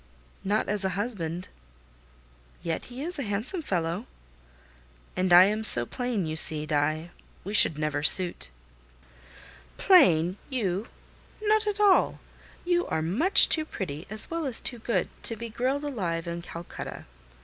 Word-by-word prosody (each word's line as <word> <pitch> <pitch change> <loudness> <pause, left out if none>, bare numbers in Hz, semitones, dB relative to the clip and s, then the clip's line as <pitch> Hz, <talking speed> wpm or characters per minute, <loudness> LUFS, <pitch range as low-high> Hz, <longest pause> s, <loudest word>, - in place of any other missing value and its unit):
"Not 205 +2 -1
as 205 -1 0
a 190 -1 -2
husband." 185 -6 -5 1.2
"Yet 165 -1 -4
he 255 +3 -9
is 345 0 -6
a - - -3
handsome 220 - -4
fellow." 180 - -4 1.1
"And 185 0 -1
I 175 +1 +8
am 210 +3 -1
so 120 - +5
plain, 245 - -4
you 155 0 -5
see, 155 -1 +3
Die. 155 +3 -2 0.3
We 200 - -7
should 160 -7 +7
never 150 -1 -3
suit." 170 - +4 1.3
"Plain! 185 - +3
You? 210 -6 -3 0.5
Not 430 0 0
at 420 0 -3
all. 405 -3 +2 0.5
You 350 0 0
are 155 - -3
much 255 - +6
too 315 - +3
pretty, 175 - -7
as 215 +7 -2
well 330 -3 -3
as 250 - -1
too 240 - -4
good, 220 -5 -2
to 230 - -1
be 230 +1 -8
grilled 260 +5 -3
alive 180 - -4
in 170 0 -5
Calcutta." 170 0 -9
200 Hz, 150 wpm, -26 LUFS, 170-260 Hz, 1.3 s, I